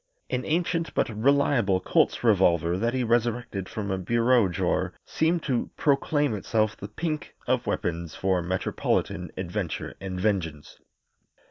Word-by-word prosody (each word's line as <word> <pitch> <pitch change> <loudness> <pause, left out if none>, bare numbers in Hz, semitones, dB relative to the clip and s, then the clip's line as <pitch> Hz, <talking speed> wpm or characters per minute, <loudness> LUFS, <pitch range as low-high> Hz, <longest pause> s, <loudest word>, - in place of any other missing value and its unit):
An 125 - 0
ancient 165 +1 0
but - - +2
reliable 120 -4 +2
Colt's 95 - +1
revolver 90 -6 +3
that 115 +6 0
he 130 - +1
resurrected 120 -4 0
from 105 -2 -4
a 95 - -1
bureau 115 +3 +3
drawer 85 - -1
seemed 160 +1 +1
to 125 -5 -1
proclaim 145 -1 +2
itself 110 +1 0
the 100 - -8
pink 155 - -4
of - - 0
weapons 85 -1 -2
for 95 -2 +1
metropolitan 90 +2 -1
adventure - - -3
and 95 -1 -4
vengeance. 90 -7 -2
110 Hz, 135 wpm, -26 LUFS, 95-130 Hz, -, revolver